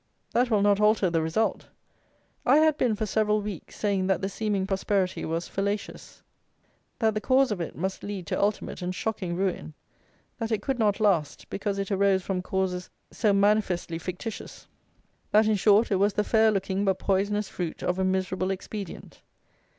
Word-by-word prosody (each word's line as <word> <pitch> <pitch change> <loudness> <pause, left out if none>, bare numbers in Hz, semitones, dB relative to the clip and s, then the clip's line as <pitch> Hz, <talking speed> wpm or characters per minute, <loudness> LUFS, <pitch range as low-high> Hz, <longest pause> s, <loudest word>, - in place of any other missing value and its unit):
That 245 +1 +2
will 210 -3 +3
not 205 -1 +4
alter 210 -4 +3
the 165 -1 +1
result. 160 +8 -1 0.8
I - - +5
had 310 -1 +4
been, 240 -6 +1
for 215 +1 -2
several 215 0 +1
weeks, 205 -5 -7
saying 195 -3 0
that 190 - +2
the 195 - -2
seeming 205 -2 -1
prosperity 195 -1 -1
was 165 +2 -2
fallacious; 200 +1 -4 0.7
that 220 -2 +2
the 215 - -2
cause 260 0 +3
of 195 -4 -2
it 165 - -5
must 190 +4 -3
lead 200 -3 -5
to - - -2
ultimate 205 -1 -1
and 180 +1 -3
shocking 185 -5 -3
ruin; 180 -4 -2 0.6
that 225 0 -3
it 210 -2 0
could 265 -2 -1
not 210 -3 +2
last, 180 -9 +1
because 200 0 -2
it 195 +1 -3
arose 195 -1 +2
from 185 -1 -2
causes 185 -1 -2 0.2
so 215 -3 +1
manifestly 195 -4 +1
fictitious; 185 +6 -7 0.6
that, 215 +1 +5
in 215 - +3
short, 210 +2 +4
it 195 - +3
was 200 +2 +2
the 210 - +1
fair 220 0 +4
looking, 195 -1 -1
but 190 -2 +1
poisonous, 200 +2 0
fruit 175 -4 -5
of 180 +1 0
a - - +2
miserable 185 0 0
expedient. 195 0 -6
200 Hz, 180 wpm, -27 LUFS, 185-215 Hz, 0.8 s, I